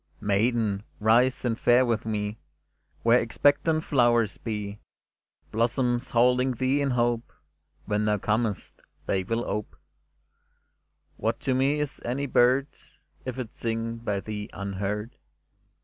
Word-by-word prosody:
Maiden, 105 0 +1 0.2
rise, 120 +5 +3
and 115 -1 0
fare 125 +2 +5
with 115 -2 -1
me 105 0 -2 0.6
Where 115 +2 +5
expectant 145 +6 +2
flowers 120 -5 +2
be 105 -2 -4 0.4
— - - -42
Blossoms 120 +2 0
holding 125 +2 +3
thee 130 +4 +1
in 140 - +1
hope: 120 -2 0 0.5
When 105 +1 0
thou 105 0 +2
comest, 105 -1 -2 0.2
they 95 - +1
will 115 +5 -2
ope. 105 0 -4 1.4
What 115 +1 -1
to 130 - 0
me 135 +3 +2
is 150 -2 -4
any 130 +4 -2
bird, 130 +1 +4 0.6
If 130 -1 -4
it 120 -3 -5
sing 115 0 -3
by 105 -4 -2
thee 105 0 -6
unheard? 100 +3 -4
115 Hz, 130 wpm, -27 LUFS, 105-125 Hz, 1.4 s, fare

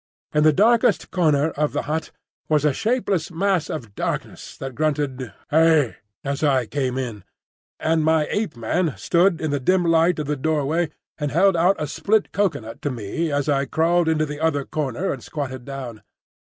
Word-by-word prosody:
In 150 - +3
the 155 - +6
darkest 220 +8 +3
corner 155 -4 +2
of 150 0 -1
the - - -1
hut 155 +1 -3 0.4
sat 150 -1 +2
a 150 - +3
shapeless 220 - 0
mass 180 -1 0
of 115 -10 -6
darkness - - -4
that 135 -1 -6
grunted 140 -4 -1 0.2
"Hey!" 160 -4 +4 0.3
as 140 0 -3
I 135 -5 +2
came 130 0 -2
in, 120 -7 -4 0.6
and 160 0 +1
my 160 -1 +3
Ape 205 -9 -1
man 150 +5 0
stood 170 - +2
in 155 -2 -2
the 145 - 0
dim 180 +7 +2
light 165 +1 +3
of 150 - -2
the 150 +1 -1
doorway 155 +3 0 0.3
and 150 -1 -1
held 190 +3 +4
out 175 +4 +4
a 150 - -2
split 205 +8 0
cocoa 190 -9 0
nut 115 +1 -10
to 145 - -1
me 130 +7 -3
as 145 0 0
I 140 -1 +2
crawled 165 +4 +2
into 155 -1 +2
the 150 0 -6
other 150 -4 0
corner 150 +4 -2
and 130 - -9
squatted 130 -4 -5
down. 130 -5 -7
155 Hz, 185 wpm, -22 LUFS, 135-165 Hz, 0.6 s, the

